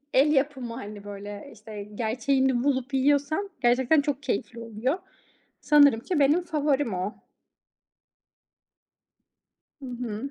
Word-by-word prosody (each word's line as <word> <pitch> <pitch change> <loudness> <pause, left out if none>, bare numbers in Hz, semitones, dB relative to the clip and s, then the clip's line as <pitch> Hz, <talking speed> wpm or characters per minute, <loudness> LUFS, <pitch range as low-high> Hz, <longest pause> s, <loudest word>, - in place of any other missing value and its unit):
el 285 +3 +5
yapımı, 265 -4 0
hani, 210 -4 -8
böyle, 205 +4 -8
işte, 215 -1 -9
gerçeğini 255 +3 +1
bulup 265 -1 0
yiyorsan 290 +8 +1
gerçekten 255 +5 +4
çok 285 -1 -2
keyifli 235 -1 -3
oluyor. 230 - -2 0.6
Sanırım 285 -5 +5
ki 305 +4 -1
benim 300 +6 +4
favorim 290 - 0
o. 185 +4 -3 2.7
Hı 270 - -8
hı. 245 +1 -5
260 Hz, 110 wpm, -26 LUFS, 225-285 Hz, 2.7 s, el